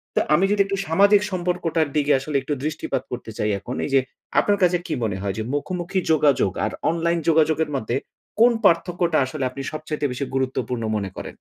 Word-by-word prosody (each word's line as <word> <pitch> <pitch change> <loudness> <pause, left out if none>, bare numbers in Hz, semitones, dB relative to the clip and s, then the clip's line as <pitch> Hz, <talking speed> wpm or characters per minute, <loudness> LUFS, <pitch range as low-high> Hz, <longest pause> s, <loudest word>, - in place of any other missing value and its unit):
তো - - +4
আমি 175 +6 +4
যদি 205 - +3
একটু 195 0 -2
সামাজিক 200 +5 +5
সম্পর্কটার 175 -3 0
দিকে 145 0 +3
আসলে 140 +2 -6
একটু 145 +2 -3
দৃষ্টিপাত 150 -4 -2
করতে 120 -2 -6
চাই 105 - 0
এখন 125 +5 -6
এই - - -4
যে - - +7 0.4
আপনার 205 -1 +2
কাছে 180 0 +4
কি - - -2
মনে 100 -4 -1
হয় 100 -1 -2
যে 110 - -2
মুখোমুখি 180 +5 -2
যোগাযোগ 145 -10 +3
আর - - -2 0.2
অনলাইন 170 +1 0
যোগাযোগের 160 0 +3
মধ্যে 120 -1 -2 0.4
কোন 240 +2 +7
পার্থক্যটা 170 -2 +2
আসলে 135 +1 -5
আপনি 135 +2 -7
সবচাইতে 155 -1 -3
বেশি 130 +3 -3
গুরুত্বপূর্ণ 130 -2 -1
মনে 100 -2 -2
করেন? - - -6
155 Hz, 190 wpm, -23 LUFS, 130-175 Hz, 0.4 s, যে